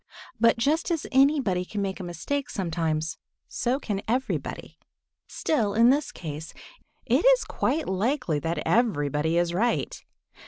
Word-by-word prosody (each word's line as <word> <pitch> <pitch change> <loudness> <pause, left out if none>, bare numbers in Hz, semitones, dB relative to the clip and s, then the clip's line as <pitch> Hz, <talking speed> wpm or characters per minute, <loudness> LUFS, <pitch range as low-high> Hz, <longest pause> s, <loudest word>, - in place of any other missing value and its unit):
But 230 +1 +4
just 300 +9 +1
as 330 -3 -1
anybody 265 -9 +3
can 205 +3 -6
make 195 -1 -2
a - - -5
mistake 180 - -3
sometimes, 160 -4 -2 0.3
so 255 +3 -1
can 205 -7 -3
everybody. 255 +4 -3 0.5
Still, 220 -10 0
in 230 +2 +6
this 290 +2 0
case, 155 -1 -7 0.5
it - - +2
is - - +5
quite 310 +2 -1
likely 195 - 0
that 165 +1 -2
everybody 160 - +1
is 175 0 +1
right. 230 +7 -1
205 Hz, 135 wpm, -26 LUFS, 170-265 Hz, 0.5 s, in